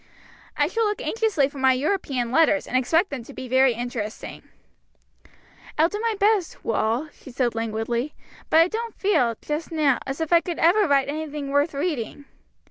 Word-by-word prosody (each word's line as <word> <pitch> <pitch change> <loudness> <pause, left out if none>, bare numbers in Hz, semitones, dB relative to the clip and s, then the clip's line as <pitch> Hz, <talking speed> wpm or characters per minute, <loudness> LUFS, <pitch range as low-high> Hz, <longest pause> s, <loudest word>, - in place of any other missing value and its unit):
"I - - +3
shall 455 -1 0
look 420 0 -1
anxiously 435 -11 +1
for 280 0 -10
my 265 0 +4
European 265 -4 -1
letters, 305 0 +3
and - - -5
expect 320 +9 +2
them 275 -3 -4
to - - -13
be 260 - -7
very 260 0 +3
interesting." 235 -3 -5 1.4
"I'll 320 +2 +4
do 415 - -4
my 455 0 0
best, 410 -4 +1
Wal," 230 +6 0
she - - -14
said 245 -1 -1
languidly, 230 +4 -2 0.3
"but 320 - +6
I 330 - +4
don't 455 +3 -5
feel, 305 - +1
just 300 +3 -4
now, 300 -5 +2
as 270 +3 -4
if 320 +1 -1
I 340 - +6
could 345 -2 -5
ever 375 +5 +4
write 275 -2 +3
anything 295 -1 -4
worth 285 +2 +1
reading." 285 -3 -3
285 Hz, 180 wpm, -24 LUFS, 255-340 Hz, 1.4 s, but